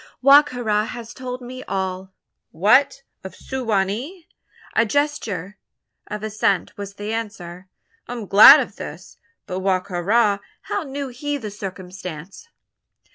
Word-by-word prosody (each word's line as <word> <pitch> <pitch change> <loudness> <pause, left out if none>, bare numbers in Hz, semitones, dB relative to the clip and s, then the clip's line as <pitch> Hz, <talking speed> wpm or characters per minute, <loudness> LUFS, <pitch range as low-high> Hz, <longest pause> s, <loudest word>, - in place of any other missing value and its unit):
"Wa 275 +2 +8
ka 270 -4 -8
ra 210 -2 +1
has 235 0 -8
told 250 0 -7
me 255 +1 -8
all." 190 0 -3 0.4
"What! 260 - +3 0.2
of 190 - -9
Su 265 0 -6
wa 210 -5 +2
nee?" 270 - -6 0.5
A - - +5
gesture 220 - -2 0.5
of 210 0 -6
assent 210 -3 0
was 200 -1 -8
the 205 +2 -5
answer. 190 -5 -6 0.4
"I - - -5
am 235 -3 -6
glad 200 +2 +9
of - - -7
this. - - -9 0.3
But 185 - -4
Wa 190 -1 +1
ka 180 -1 -6
ra! 205 +2 +2 0.2
how - - -2
knew 280 -2 -5
he 290 +4 -3
the 215 -6 -7
circumstance?" 185 - -8
210 Hz, 150 wpm, -22 LUFS, 190-255 Hz, 0.5 s, glad